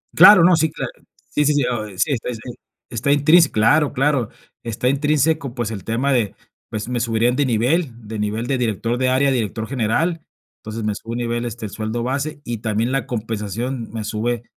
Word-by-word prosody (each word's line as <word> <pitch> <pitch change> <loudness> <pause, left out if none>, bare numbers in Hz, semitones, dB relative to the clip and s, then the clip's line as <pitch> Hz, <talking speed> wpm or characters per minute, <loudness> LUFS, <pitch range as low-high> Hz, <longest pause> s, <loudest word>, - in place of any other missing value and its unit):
Claro, 185 +1 +9
no, 180 0 +6
sí, 160 -1 +1
cla - - -4 0.4
sí, 150 - +1
sí, 150 - +3
sí, 145 -3 +2
o 110 -4 -2
sí, 95 - -13 0.2
sí, 125 - -4
sí. 110 - -8 0.5
Está 125 +4 -1
intrins 155 +3 +5
claro, 145 +8 +3
claro, 135 -4 +1 0.3
está 115 +1 -2
intrínseco, 145 0 +1
pues, 120 -3 -3
el 100 -5 -6
tema 125 +5 0
de, 115 -6 0 0.3
pues, 110 +1 -4
me 125 -1 -1
subirían 115 +1 +1
de 145 - +2
nivel, 130 +6 +1 0.2
de 110 0 -5
nivel 105 +3 -2
de 135 - 0
director 115 0 -1
de 130 0 +1
área 135 +2 +3
a - - +1
director 110 -2 -2
general. 140 +7 0 0.4
Entonces, 110 +1 -6
me 105 - 0
sube 115 +3 -8
un 120 - -3
nivel, 120 0 -2
este, 115 -1 -5
el 100 - -6
sueldo 110 +2 -3
base 145 +4 -2
y 120 -2 -4
también 110 +2 -1
la 135 -4 0
compensación 115 +2 -4
me 110 -1 -4
sube 115 +2 -2
120 Hz, 205 wpm, -21 LUFS, 110-140 Hz, 0.5 s, Claro